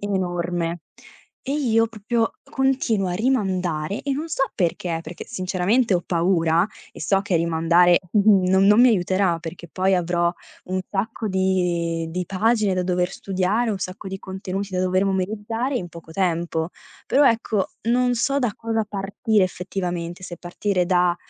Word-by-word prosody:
enorme. 175 Hz, -3 st, -2 dB, 0.6 s
E 275 Hz, -, -2 dB
io 230 Hz, -6 st, +2 dB
proprio 225 Hz, +1 st, -1 dB
continuo 265 Hz, -8 st, 0 dB
a -, -, -2 dB
rimandare 190 Hz, -7 st, 0 dB
e 280 Hz, -, -1 dB
non 300 Hz, +4 st, -3 dB
so 270 Hz, -3 st, +1 dB
perché. 170 Hz, -2 st, -1 dB
Perché 165 Hz, +2 st, -8 dB
sinceramente 195 Hz, +2 st, +1 dB
ho 175 Hz, -, +1 dB
paura 170 Hz, 0 st, +2 dB, 0.3 s
e -, -, -12 dB
so 195 Hz, -1 st, +1 dB
che 200 Hz, -3 st, -2 dB
rimandare 170 Hz, +1 st, +4 dB
n 205 Hz, -2 st, +5 dB
non 190 Hz, +1 st, +4 dB
non 210 Hz, +2 st, +6 dB
mi 250 Hz, -, +7 dB
aiuterà, 185 Hz, -4 st, +2 dB
perché 170 Hz, +1 st, -8 dB
poi 190 Hz, +4 st, +1 dB
avrò 175 Hz, -1 st, +1 dB, 0.3 s
un 185 Hz, +1 st, -2 dB
sacco 215 Hz, +2 st, -2 dB
di 180 Hz, -3 st, 0 dB
di 180 Hz, +1 st, -3 dB
pagine 210 Hz, 0 st, +1 dB
da 185 Hz, -, 0 dB
dover 180 Hz, 0 st, 0 dB
studiare, 195 Hz, +5 st, 0 dB
un 200 Hz, -, -2 dB
sacco 185 Hz, +2 st, -6 dB
di 190 Hz, 0 st, -5 dB
contenuti 190 Hz, 0 st, -5 dB
da 180 Hz, -, +1 dB
dover 185 Hz, +1 st, +2 dB
memorizzare 215 Hz, +7 st, -1 dB
in 175 Hz, -6 st, -4 dB
poco 165 Hz, -1 st, -12 dB
tempo. 170 Hz, -2 st, -1 dB, 0.4 s
Però 280 Hz, +1 st, +4 dB
ecco, 225 Hz, -4 st, +1 dB, 0.2 s
non 245 Hz, +1 st, +3 dB
so 275 Hz, +4 st, +1 dB
da 245 Hz, -6 st, 0 dB
cosa 225 Hz, -1 st, -1 dB
partire 205 Hz, +2 st, 0 dB
effettivamente, 180 Hz, -1 st, -4 dB
se 175 Hz, -1 st, -7 dB
partire 180 Hz, +1 st, -1 dB
da 180 Hz, -1 st, +3 dB
190 Hz, 160 wpm, -23 LUFS, 175-220 Hz, 0.6 s, mi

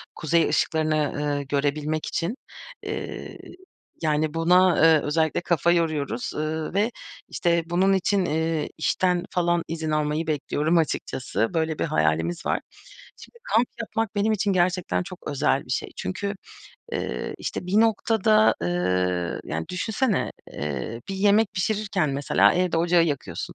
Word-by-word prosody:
kuzey 165 Hz, +1 st, +2 dB
ışıklarını, 155 Hz, -2 st, +1 dB
ııı, 145 Hz, -1 st, -1 dB
görebilmek 145 Hz, +2 st, -1 dB
için. 175 Hz, +7 st, -2 dB, 0.5 s
Iıı, -, -, -5 dB, 0.6 s
yani, 155 Hz, -1 st, +1 dB
buna, 180 Hz, +3 st, +5 dB
ııı, 160 Hz, -1 st, +5 dB
özellikle 160 Hz, +2 st, +1 dB
kafa 170 Hz, 0 st, +2 dB
yoruyoruz, 155 Hz, -7 st, -1 dB
ııı, 155 Hz, +1 st, -3 dB
ve 210 Hz, +5 st, +1 dB, 0.4 s
işte, 170 Hz, -1 st, +1 dB
bunun 180 Hz, +3 st, +2 dB
için, 195 Hz, 0 st, +1 dB
ııı, 160 Hz, -1 st, -1 dB
işten 180 Hz, +2 st, +1 dB
falan 175 Hz, -1 st, +1 dB
izin 160 Hz, -1 st, -3 dB
almayı 155 Hz, +1 st, 0 dB
bekliyorum 155 Hz, +2 st, 0 dB
açıkçası. 120 Hz, -, -1 dB
Böyle 160 Hz, -1 st, -1 dB
bir -, -, +1 dB
hayalimiz 80 Hz, +2 st, 0 dB
var. -, -, +1 dB, 0.6 s
Şimdi 470 Hz, -, -15 dB
kamp 230 Hz, +3 st, +2 dB
yapmak 225 Hz, -1 st, -2 dB
benim 210 Hz, +2 st, +2 dB
için 200 Hz, -1 st, +1 dB
gerçekten 180 Hz, 0 st, +1 dB
çok 180 Hz, 0 st, -9 dB
özel 140 Hz, -1 st, +1 dB
bir -, -, -12 dB
şey. 130 Hz, -, -1 dB
Çünkü, 200 Hz, +2 st, -3 dB, 0.6 s
ııı, -, -, -3 dB
işte, -, -, -4 dB
bir 200 Hz, +4 st, +3 dB
noktada, 220 Hz, -1 st, +3 dB
ııı, 90 Hz, 0 st, 0 dB
yani, 80 Hz, +2 st, -4 dB
düşünsene, 215 Hz, +4 st, 0 dB, 0.2 s
eee, 75 Hz, -, -4 dB
bir 195 Hz, -, -3 dB
yemek 205 Hz, +2 st, +3 dB
pişirirken 200 Hz, -5 st, 0 dB
mesela, 140 Hz, +1 st, +3 dB
evde 180 Hz, -1 st, +1 dB
ocağı 170 Hz, +1 st, +4 dB
yakıyorsun 135 Hz, -, -4 dB
165 Hz, 140 wpm, -25 LUFS, 145-185 Hz, 0.6 s, buna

